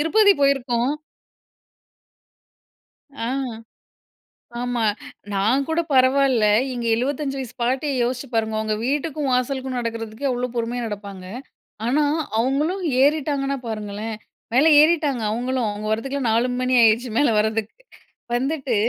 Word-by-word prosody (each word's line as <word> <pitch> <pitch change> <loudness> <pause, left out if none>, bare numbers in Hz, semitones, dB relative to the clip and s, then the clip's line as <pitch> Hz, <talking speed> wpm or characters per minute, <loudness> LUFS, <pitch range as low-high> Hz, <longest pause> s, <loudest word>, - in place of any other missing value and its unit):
திருப்பதி 405 +6 +5
போயிருக்கோம். 265 -1 +1 2.3
ஆ, - - -2 1.4
ஆமா. 245 -1 -1 0.5
நான் 225 +8 +2
கூட 320 +1 0
பரவாயில்ல. 260 -3 +4 0.3
எங்க 240 -1 -4
75 275 +3 -2
வயசு 255 -4 -6
பாட்டிய 260 +4 0
யோசிச்சு 250 +3 -2
பாருங்க, 220 -1 0
அவுங்க 215 0 -1
வீட்டுக்கும், 290 +1 -1
வாசலுக்கும் 255 0 -1
நடக்கிறதுக்கே 230 +2 -4
அவ்ளோ 250 0 -1
பொறுமையா 240 +1 -2
நடப்பாங்க. 200 -3 -7 0.6
ஆனா, 290 +5 +2 0.4
அவுங்களும் 295 +10 0 0.2
ஏறிட்டாங்கன்னா 280 -1 +1
பாருங்களேன்! 215 0 -4 0.4
மேல 270 +6 +5
ஏறிட்டாங்க 300 -6 +2
அவுங்களும். 245 +1 -1
அவுங்க 205 +1 -5
வரதுக்கெல்லாம் 265 +3 -1
4:00 235 +3 +2
மணி 255 0 0
ஆயிடுச்சு, 230 +2 +3
மேல 290 - +4
வர்றதுக்கு. 220 0 -1 0.6
வந்துட்டு 270 -1 -1
250 Hz, 110 wpm, -22 LUFS, 225-280 Hz, 2.3 s, திருப்பதி